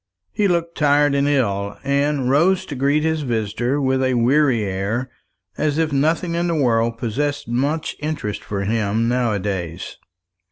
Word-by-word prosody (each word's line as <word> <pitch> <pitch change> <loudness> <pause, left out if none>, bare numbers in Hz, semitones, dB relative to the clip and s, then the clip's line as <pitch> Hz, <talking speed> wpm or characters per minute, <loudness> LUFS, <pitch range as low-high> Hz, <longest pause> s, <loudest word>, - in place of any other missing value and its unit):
He 210 -2 +1
looked 170 -2 -1
tired 145 -1 +3
and 140 0 +2
ill, 100 -8 0
and 140 -1 0
rose 170 +8 +3
to 145 - -6
greet 140 +3 +1
his 160 -1 0
visitor 120 +1 -1
with 130 -1 +1
a 130 -1 +1
weary 125 -1 +3
air, 100 +6 -2 0.5
as 150 -1 0
if 160 -2 0
nothing 160 +5 +1
in 170 +1 0
the 170 - 0
world 115 -5 +1
possessed 145 +5 -2
much 140 +7 -1
interest 150 -9 -4
for 100 -1 -4
him 110 +1 0
now 120 -2 +1
a - - 0
days. 90 -4 -4
135 Hz, 165 wpm, -21 LUFS, 115-150 Hz, 0.5 s, tired